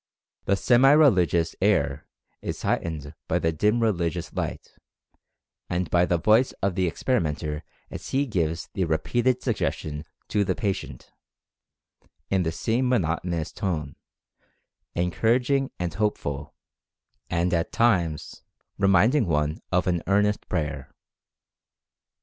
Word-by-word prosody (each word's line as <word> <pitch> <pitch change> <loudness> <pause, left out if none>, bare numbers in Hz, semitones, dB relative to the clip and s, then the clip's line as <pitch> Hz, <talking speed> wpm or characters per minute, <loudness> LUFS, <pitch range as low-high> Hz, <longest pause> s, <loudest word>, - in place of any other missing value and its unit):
The 100 - +3
semi 125 +7 +5
religious 90 - +4
air 75 -9 +1 0.3
is - - -5
heightened 75 -3 -2
by - - +1
the 80 - +1
'dim 105 +9 +1
religious 85 -6 -1
light/ - - -4 1.0
and 90 0 -2
by 90 0 +4
the 85 - +2
voice 110 +8 +3
of 95 -1 -1
the 90 0 +1
experimenter 80 - -1 0.3
as - - -7
he 140 +2 +1
gives 85 - -1
the 95 - 0
repeated 120 +11 0
suggestions 80 - -2 0.2
to 105 -1 +2
the - - 0
patient, 100 -5 -4 1.2
in 95 -1 +3
the 80 -2 0
same 120 +9 0
monotonous 85 -6 0
tone, 80 -9 -3 1.0
encouraging 120 +10 +1
and 85 -3 -3
hopeful, 75 -9 -2 0.7
and 85 +1 0
at 85 0 0
times 90 -10 +1 0.4
reminding 100 +6 +4
one 75 0 0
of 90 0 +2
an 90 -2 0
earnest 105 +1 +1
prayer. 75 -6 -3
90 Hz, 120 wpm, -25 LUFS, 80-110 Hz, 1.2 s, semi